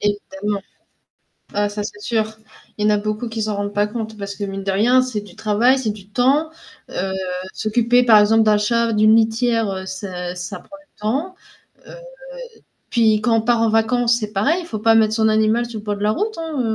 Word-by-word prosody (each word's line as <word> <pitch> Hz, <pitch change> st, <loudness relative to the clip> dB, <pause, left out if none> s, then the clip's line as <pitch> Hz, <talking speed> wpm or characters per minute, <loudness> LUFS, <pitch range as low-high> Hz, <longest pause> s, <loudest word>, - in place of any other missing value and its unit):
Évidemment, 205 Hz, 0 st, -2 dB, 0.9 s
ah 205 Hz, 0 st, 0 dB
ça 205 Hz, 0 st, -4 dB
c'est 205 Hz, 0 st, -7 dB
sûr. 220 Hz, -1 st, -2 dB, 0.4 s
Il 210 Hz, -, -2 dB
y -, -, +4 dB
en -, -, +4 dB
a -, -, +1 dB
beaucoup 215 Hz, +3 st, -3 dB
qui 225 Hz, -1 st, -4 dB
s'en 215 Hz, -1 st, -2 dB
rendent 205 Hz, 0 st, -3 dB
pas 205 Hz, +1 st, +1 dB
compte, 220 Hz, -1 st, -6 dB
parce 200 Hz, 0 st, -6 dB
que 205 Hz, -, -6 dB
mine 195 Hz, 0 st, -5 dB
de 195 Hz, -, -1 dB
rien, 245 Hz, +6 st, +4 dB
c'est 245 Hz, -5 st, -3 dB
du 205 Hz, -2 st, -15 dB
travail, 220 Hz, +4 st, +2 dB
c'est 225 Hz, -4 st, -2 dB
du 200 Hz, -2 st, -12 dB
temps. 275 Hz, +8 st, +2 dB, 0.4 s
Heu, 190 Hz, +1 st, -3 dB, 0.4 s
s'occuper 235 Hz, +3 st, +2 dB
par 220 Hz, -3 st, +7 dB
exemple 220 Hz, +2 st, +4 dB
d'un 210 Hz, -1 st, +4 dB
chat, 230 Hz, +2 st, +1 dB
d'une 215 Hz, +1 st, +5 dB
litière, 225 Hz, 0 st, +1 dB
heu, 190 Hz, 0 st, -5 dB
ça 180 Hz, -2 st, -6 dB
ça 180 Hz, +3 st, -6 dB
prend 295 Hz, -, -14 dB
du 295 Hz, -5 st, -25 dB
temps. 290 Hz, -, -2 dB, 0.5 s
Heu, -, -, -11 dB, 1.0 s
puis 220 Hz, -3 st, +3 dB
quand 235 Hz, +1 st, +1 dB
on -, -, +2 dB
part 235 Hz, 0 st, +1 dB
en 230 Hz, -, +3 dB
vacances, 235 Hz, +2 st, +2 dB
c'est 210 Hz, -1 st, -5 dB
pareil, 250 Hz, -, +2 dB
il 340 Hz, -, -10 dB
faut 220 Hz, -, -4 dB
pas 225 Hz, +1 st, +4 dB
mettre 220 Hz, -1 st, +3 dB
son 220 Hz, -1 st, +2 dB
animal 220 Hz, +2 st, +2 dB
sur 225 Hz, -2 st, -7 dB
le 210 Hz, -, -13 dB
bord 205 Hz, -1 st, -2 dB
de 205 Hz, -, -5 dB
la 210 Hz, -, +3 dB
route, 430 Hz, -, -2 dB
hein, 320 Hz, -4 st, -3 dB
220 Hz, 220 wpm, -20 LUFS, 205-235 Hz, 1.0 s, par